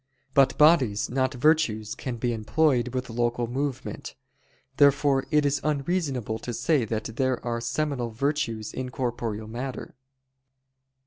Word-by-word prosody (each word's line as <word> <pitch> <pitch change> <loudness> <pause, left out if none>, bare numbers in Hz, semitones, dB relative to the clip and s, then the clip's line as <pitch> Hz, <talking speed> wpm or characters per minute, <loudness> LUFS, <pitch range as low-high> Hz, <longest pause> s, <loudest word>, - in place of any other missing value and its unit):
But 135 -2 +4
bodies, 135 -11 +4
not 130 0 0
virtues, 125 -7 +2
can 125 -3 -5
be 120 +1 -1
employed 125 +3 +1
with 125 -2 -3
local 120 +1 0
movement. 135 +2 -4 0.6
Therefore 140 -1 +4
it 150 -1 +3
is 145 0 +1
unreasonable 140 - -1
to 120 +1 -5
say 150 -4 +1
that 110 +1 -4
there 130 -2 +1
are 115 -1 -2
seminal 130 0 -2
virtues 115 -3 -2
in 130 -1 -4
corporeal 120 -4 -3
matter. 125 +4 -6
130 Hz, 130 wpm, -26 LUFS, 115-145 Hz, 0.6 s, But